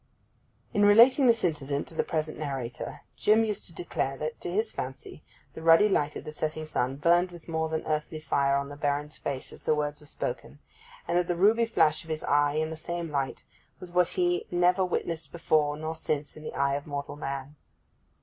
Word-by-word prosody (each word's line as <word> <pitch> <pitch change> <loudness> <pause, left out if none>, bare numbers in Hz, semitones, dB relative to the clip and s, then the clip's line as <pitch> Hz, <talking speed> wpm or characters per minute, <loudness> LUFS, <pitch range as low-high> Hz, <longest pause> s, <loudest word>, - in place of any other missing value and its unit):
In 205 -2 +3
relating 235 +6 +7
this 230 -1 +4
incident 145 -4 -1
to - - -11
the - - 0
present 155 -2 -3
narrator 135 -5 -5 0.2
Jim 220 +2 +4
used 210 -2 -3
to 170 - -8
declare 135 -6 -2
that, 155 +2 -5
to - - -4
his 215 +4 0
fancy, 130 +3 -6 0.3
the - - -8
ruddy 165 +5 +6
light 150 -7 +1
of - - -6
the - - -7
setting 155 +1 -3
sun 135 -3 -1
burned 170 +5 +3
with 175 -2 -13
more 160 -1 -1
than 160 0 -2
earthly 155 0 -2
fire 140 -2 +1
on 140 0 -1
the 145 - -8
Baron's 145 +1 -2
face 135 -2 -4
as - - -12
the 155 - +2
words 150 0 -2
were 150 - -13
spoken; 125 -1 -5 0.5
and 175 - +2
that 175 - -1
the 175 - 0
ruby 215 +6 +4
flash 155 -8 +2
of 165 - -15
his 155 -1 -3
eye 145 0 +3
in 155 +1 -1
the - - -4
same 170 0 -4
light 140 -2 -2 0.4
was 180 -1 -9
what 180 0 +3
he 175 -1 +1
never 180 +2 +3
witnessed 165 -4 -2
before 155 -3 +1
nor 155 +1 -3
since 150 -2 -3
in 155 - -11
the 155 - -7
eye 140 0 +1
of 145 +2 -3
mortal 145 0 -4
man. 140 -1 -5
155 Hz, 210 wpm, -28 LUFS, 145-175 Hz, 0.5 s, relating